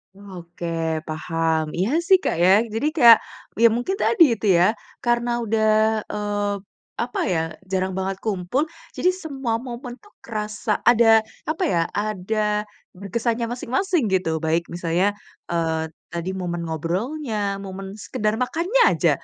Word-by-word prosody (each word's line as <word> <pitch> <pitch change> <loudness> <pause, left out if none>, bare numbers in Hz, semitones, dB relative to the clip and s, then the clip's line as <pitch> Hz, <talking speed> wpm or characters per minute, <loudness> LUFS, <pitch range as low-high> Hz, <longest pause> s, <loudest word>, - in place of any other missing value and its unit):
Oke, 180 -4 -10 0.4
paham. 160 0 -1
Iya 190 +5 +1 0.2
sih, 380 - +8
Kak, - - 0
ya. 185 - +6 0.2
Jadi 225 +7 0
kayak 235 -5 +9 0.5
ya - - +10
mungkin 245 +12 -2
tadi 410 -7 +5
itu 220 - -5
ya 175 - +5 0.4
karena 240 0 +1
udah, 220 0 +1 0.5
eee, 205 -1 -1 0.5
apa 245 - -4
ya, 165 - +1 0.3
jarang 190 0 0
banget 190 0 -2
kumpul, 210 +6 0 0.3
jadi 365 - +2
semua 275 -10 -3
momen 245 0 -8
tuh 415 - -22
kerasa 215 -1 -4 0.2
ada 225 -2 +6 0.2
apa 320 +5 -2
ya, 170 - +1
ada 210 +1 -1 0.3
berkesannya 230 +5 -2
masing-masing 265 - 0
gitu, 180 -5 0
baik 165 +2 +1
misalnya, 175 +3 +1 0.4
eee, 160 -1 -1 0.2
tadi 170 +1 -4
momen 175 -2 -3
ngobrolnya, 200 - -2
momen 195 0 -7
sekedar 215 +2 -2
makannya 340 - +1
aja. - - +2
210 Hz, 135 wpm, -23 LUFS, 180-240 Hz, 0.5 s, ya